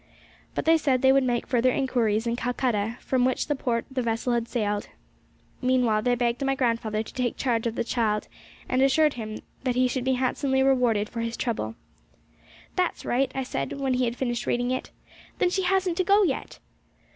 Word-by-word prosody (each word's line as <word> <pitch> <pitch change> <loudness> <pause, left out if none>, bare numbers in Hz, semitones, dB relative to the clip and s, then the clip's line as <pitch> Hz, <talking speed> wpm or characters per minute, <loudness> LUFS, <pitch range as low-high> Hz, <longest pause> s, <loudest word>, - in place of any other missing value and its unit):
But - - -2
they 325 0 +5
said 265 -4 +1
they 265 - +7
would 270 0 +4
make 245 -2 0
further 250 0 +2
inquiries 235 -5 +1
in 235 0 0
Calcutta, 240 -2 -1
from 255 -2 +1
which 255 0 +1
port 235 -2 -1
the 260 -1 -1
vessel 235 +1 -1
had 235 -1 0
sailed. 210 -4 -1 0.7
Meanwhile 250 -4 +2
they 245 +2 +2
begged 240 +1 0
my 270 0 +1
grandfather 230 -4 0
to - - -12
take 250 -2 -1
charge 235 -3 0
of 230 - -3
the - - 0
child, 220 -3 0 0.4
and 255 +1 +1
assured 295 +2 +4
him 215 -2 -6 0.2
he 255 -1 +2
should 250 0 -2
be 260 +1 +2
handsomely 265 +1 +1
rewarded 245 -6 +2
for 230 - -7
his 230 0 -3
trouble. 115 - -2 1.0
'That's - - -1
right!' 260 +2 +1
I 265 - -1
said, 255 - -3
when 270 -2 -1
he 250 0 +1
had 235 0 -2
finished 240 -2 -2
reading 245 +1 0
it. 255 - -3 0.5
'Then 355 - +2
she 380 - +1
hasn't 370 -2 +1
to 370 - +2
go 400 +3 +5
yet!' 290 -8 -2
250 Hz, 190 wpm, -26 LUFS, 230-265 Hz, 1.0 s, they